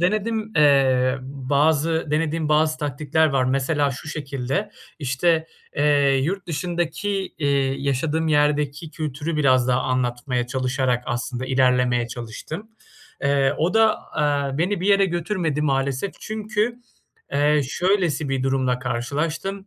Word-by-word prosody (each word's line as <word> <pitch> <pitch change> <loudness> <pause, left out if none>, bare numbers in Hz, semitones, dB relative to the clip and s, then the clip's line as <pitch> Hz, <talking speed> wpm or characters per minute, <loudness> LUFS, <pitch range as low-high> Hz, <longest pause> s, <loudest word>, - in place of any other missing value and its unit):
denedim 215 +4 0
eee, 135 -3 +4
bazı 145 +4 +1
denediğim 155 0 0
bazı 155 0 +2
taktikler 150 +2 +1
var. 135 -3 +1
Mesela 140 +2 +1
şu 140 +4 -8
şekilde: 140 +6 -3 0.3
İşte, 160 +4 +1 0.3
eee, 145 -2 +3
yurt 185 +5 -2
dışındaki, 175 +3 -2 0.3
eee, 145 -2 0 0.3
yaşadığım 150 +4 -1
yerdeki 150 +1 +1
kültürü 155 0 -4
biraz 130 -4 +3
daha 125 +1 +2
anlatmaya 125 0 -1
çalışarak 130 -1 0
aslında 125 +1 -3
ilerlemeye 125 -2 +2
çalıştım. 125 - -7 0.5
Eee, 140 0 +2
o 175 +7 +1
da, 220 -1 +4 0.2
eee, 145 -1 0
beni 185 +2 0
bir 190 - -2
yere 200 -1 +5
götürmedi 170 -4 -1
maalesef. 135 +4 0
Çünkü, 215 +2 -2 0.6
eee, 145 +1 +3
şöylesi 175 -5 0
bir 135 -1 -1
durumla 130 -2 +1
karşılaştım, 150 - -3
145 Hz, 120 wpm, -23 LUFS, 130-165 Hz, 0.6 s, yere